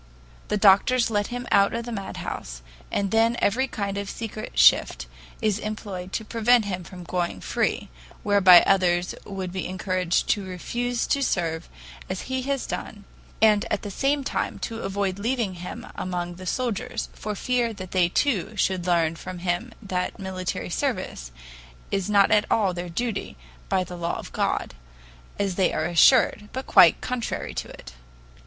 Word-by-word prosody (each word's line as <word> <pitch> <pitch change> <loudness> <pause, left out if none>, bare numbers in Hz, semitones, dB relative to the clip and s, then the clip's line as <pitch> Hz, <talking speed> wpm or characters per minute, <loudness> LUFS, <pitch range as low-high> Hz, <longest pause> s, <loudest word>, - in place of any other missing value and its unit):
The 210 - 0
doctors 215 +5 +4
let 205 -1 +1
him 245 0 -5
out 200 +2 +4
of 230 0 -3
the 240 - -6
madhouse, - - -6 0.3
and 200 -1 -1
then 225 +1 +3
every 260 +6 +1
kind 200 -4 -3
of 200 -1 -5
secret 220 -1 -6
shift - - +5 0.4
is 210 -2 +1
employed 205 -4 -5
to 220 - -2
prevent 230 +1 +3
him 185 -3 -3
from 180 +1 -10
going 175 - -2
free - - -1 0.4
whereby 195 -4 +7
others 180 -2 +2
would 190 -2 -5
be 185 0 -3
encouraged 185 -1 0
to 205 - +2
refuse 235 +7 -2
to 280 - 0
serve 170 -9 -1 0.4
as 185 0 -3
he 260 0 -3
has 275 0 -2
done 205 -1 -6 0.4
and 210 -2 +5
at 210 - -1
the 205 - -5
same 280 +6 0
time - - -2
to 225 0 -5
avoid 195 -1 -2
leaving 230 -2 -1
him 180 - -7
among 175 -1 -3
the 185 0 -8
soldiers, 250 +2 -2
for 210 0 -5
fear 245 +2 0
they 185 -3 0
too 215 - 0
should 185 -2 0
learn 165 -2 +2
from 185 +2 -7
him 175 +7 -2
that 180 -2 -2
military 185 -2 -4
service 60 0 -3 0.6
is 195 0 -1
not 200 -1 +4
at 210 0 +4
all 200 -5 +2
their 175 0 -5
duty 200 - -3 0.3
by 185 - +2
the 180 0 -8
law 170 0 -2
of - - -9
God, - - -1 0.6
as 200 -2 0
they 190 - +3
are - - -1
assured, 210 +4 +4
but 260 +1 -4
quite - - +6
contrary 250 -2 -3
to - - -4
it. - - -11
200 Hz, 165 wpm, -25 LUFS, 180-225 Hz, 0.6 s, whereby